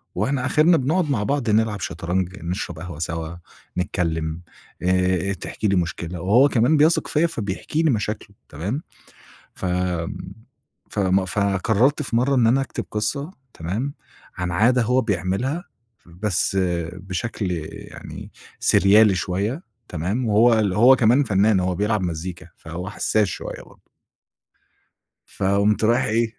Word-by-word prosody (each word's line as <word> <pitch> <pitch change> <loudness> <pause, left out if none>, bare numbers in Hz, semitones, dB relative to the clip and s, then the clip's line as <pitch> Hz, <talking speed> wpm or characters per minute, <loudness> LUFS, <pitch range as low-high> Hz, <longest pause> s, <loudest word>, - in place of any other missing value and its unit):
وإحنا 135 -2 0
آخِرْنا 160 +5 +4
بنقعد 155 +4 0
مع 105 -6 0
بعض 135 -2 -1
نلعب 105 -1 +2
شطرنج 90 +3 -3
نشرب 85 -2 -4
قهوة 90 -3 -8
سوا، 80 0 -4 0.4
نتكلم 80 -2 -2 0.4
آآ، 90 +1 +1
تحكي 105 +2 -4
لي 100 - +2
مشكلة، 85 -1 -2
وهو 120 +10 +5
كمان 130 +6 +3
بيثق 155 +3 +3
فيّا 160 +3 +2
فبيحكي 115 - -3
لي 160 - +3
مشاكله 105 -1 -3
تمام؟ 100 - -4 0.7
ف 95 - -5 1.2
فم 95 -1 +1
فقرّرت 100 - +1
في 115 -4 -2
مرّة 135 +3 +2
إن 120 -3 +4
أنا 130 +4 +4
أكتب 135 - -4
قصة 140 +9 -2 0.2
تمام؟ 105 +13 -3 0.4
عن 90 -1 -2
عادة 120 +7 +3
هو 125 +3 +2
بيعملها 110 - -1 0.4
بس 95 +2 -1
آآ، 85 -2 -1
بشكل 95 0 -3
آآ، 80 -3 -4
يعني - - -10 0.3
سِرْيالي 100 +2 +5
شوية 100 - -2 0.3
تمام؟ 95 +9 -2
وهو 110 +2 +5
ال 100 -3 +1
هو 120 +7 +6
كمان 125 +5 +4
فنّان 100 -1 +3
هو 90 0 0
بيلعب 105 +3 0
مزيكا 90 +1 -5
فهو 90 +4 -7
حسّاس 105 0 +1
شوية - - -6
برضه - - -19 1.5
فقُمت 100 +2 +2
رايح 120 +3 +3
إيه؟ 115 0 0
105 Hz, 135 wpm, -22 LUFS, 90-120 Hz, 1.5 s, هو